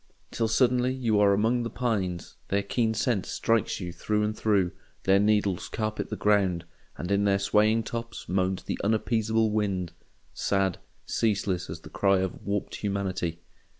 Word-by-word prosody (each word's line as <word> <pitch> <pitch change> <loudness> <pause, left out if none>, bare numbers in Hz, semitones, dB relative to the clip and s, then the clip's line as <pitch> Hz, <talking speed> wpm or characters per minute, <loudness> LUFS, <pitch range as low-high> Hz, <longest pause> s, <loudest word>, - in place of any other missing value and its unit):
Till 115 - 0
suddenly 125 +2 +3
you 115 -5 +1
are 100 -1 +5
among 110 +5 +2
the 115 - -2
pines, 100 -8 -2
their 100 +1 0
keen 110 +2 0
scent 110 -3 +1
strikes 115 -1 0
you 90 -3 -5
through 105 +5 0
and 105 0 -1
through, 100 -6 +2 0.3
their 95 +1 +4
needles 105 -3 +1
carpet 110 -1 -3
the - - -3
ground, 95 -5 +2 0.3
and 90 - -4
in 100 0 +3
their 100 -1 +3
swaying 105 +3 +3
tops 115 +1 -6
moans 95 0 0
the - - -4
unappeasable 110 +1 +1
wind—sad, 95 -1 -2 0.3
ceaseless, 100 -5 0
as - - -6
the - - -11
cry 100 -1 +3
of 95 -1 -1
a - - -12
warped 100 0 -3
humanity. 95 -4 -2
105 Hz, 160 wpm, -27 LUFS, 95-110 Hz, 0.3 s, are